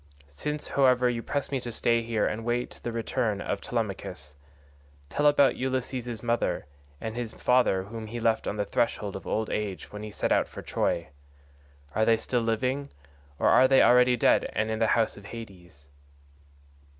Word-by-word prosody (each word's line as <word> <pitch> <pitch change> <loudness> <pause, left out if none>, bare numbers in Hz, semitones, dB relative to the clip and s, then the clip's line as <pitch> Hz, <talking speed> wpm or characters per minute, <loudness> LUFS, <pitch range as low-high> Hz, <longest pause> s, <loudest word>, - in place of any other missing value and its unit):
Since, 150 - -4
however, 125 -2 +4
you 115 -1 -3
press 145 +4 -3
me 135 - 0
to 120 -1 -6
stay 115 +1 +2
here 115 -2 0
and 110 - -1
await 120 +1 -2
the 120 - -3
return 115 -2 -1
of - - -3
Telemachus, 75 - -4 0.8
tell 145 - 0
me - - +9
about 140 -2 +4
Ulysses' 125 -3 -3
mother, 120 0 0 0.3
and 110 0 -5
his 120 -2 -4
father 125 -7 +2
whom 110 +2 -7
he 120 +2 -5
left 115 -1 +1
on - - -2
the 105 - 0
threshold 105 -1 -1
of 95 - -8
old 110 0 -1
age 105 -3 -3
when 105 - -7
he 105 - -6
set - - -2
out - - +3
for - - -9
Troy. - - -1 0.8
Are 110 - +2
they 115 0 +4
still 120 +2 -1
living 125 +5 -1 0.5
or - - +3
are 130 - +6
they 135 0 +6
already 125 0 +5
dead - - +3
and 110 0 0
in 110 - -2
the 115 - +3
house 115 -3 +1
of 100 - -12
Hades?" 90 -11 -11
115 Hz, 185 wpm, -27 LUFS, 110-125 Hz, 0.8 s, me